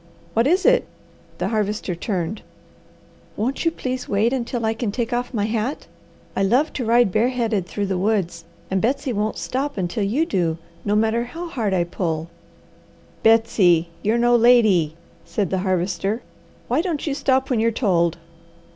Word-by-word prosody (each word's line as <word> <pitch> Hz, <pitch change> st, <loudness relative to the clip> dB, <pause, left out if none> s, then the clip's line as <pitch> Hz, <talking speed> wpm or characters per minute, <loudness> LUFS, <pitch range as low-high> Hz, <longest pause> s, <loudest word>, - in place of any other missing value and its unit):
"What 230 Hz, +3 st, +3 dB
is 365 Hz, +5 st, +2 dB
it?" -, -, +4 dB, 0.5 s
the -, -, -1 dB
Harvester 210 Hz, -3 st, -1 dB
turned. 180 Hz, +2 st, -3 dB, 1.0 s
"Won't 255 Hz, +9 st, -1 dB
you -, -, +5 dB
please 255 Hz, -5 st, -4 dB
wait 215 Hz, +5 st, +2 dB
until 240 Hz, -2 st, -2 dB
I 220 Hz, -, +1 dB
can 225 Hz, -2 st, -2 dB
take 235 Hz, +2 st, -2 dB
off 245 Hz, +1 st, -1 dB
my 210 Hz, -5 st, 0 dB
hat? 225 Hz, +5 st, -2 dB, 0.5 s
I -, -, 0 dB
love 250 Hz, +11 st, +2 dB
to 250 Hz, -, -3 dB
ride 235 Hz, -2 st, +4 dB
bareheaded 225 Hz, -3 st, 0 dB
through 205 Hz, +2 st, -2 dB
the 190 Hz, -2 st, -1 dB
woods, 185 Hz, -4 st, 0 dB, 0.3 s
and 190 Hz, -1 st, +1 dB
Betsy 255 Hz, +2 st, 0 dB
won't 210 Hz, +1 st, -1 dB
stop 280 Hz, +1 st, -3 dB
until 185 Hz, +3 st, -1 dB
you 245 Hz, +12 st, +1 dB
do, 170 Hz, -, 0 dB, 0.3 s
no 205 Hz, 0 st, +1 dB
matter 225 Hz, +2 st, +2 dB
how 335 Hz, +7 st, -7 dB
hard 215 Hz, -10 st, -1 dB
I 175 Hz, -, +2 dB
pull." 170 Hz, -2 st, -3 dB, 0.9 s
"Betsy, 210 Hz, -7 st, +4 dB
you're 220 Hz, +3 st, +1 dB
no 240 Hz, 0 st, +4 dB
lady!" 220 Hz, -10 st, +4 dB, 0.3 s
said 200 Hz, -5 st, -2 dB
the 190 Hz, -, +1 dB
Harvester. 190 Hz, +4 st, -1 dB, 0.4 s
"Why 255 Hz, +6 st, +2 dB
don't 335 Hz, -5 st, -2 dB
you 295 Hz, -, -1 dB
stop 265 Hz, -1 st, +1 dB
when 240 Hz, -, +2 dB
you're 230 Hz, +1 st, +3 dB
told?" 175 Hz, -8 st, +1 dB
220 Hz, 165 wpm, -22 LUFS, 190-245 Hz, 1.0 s, you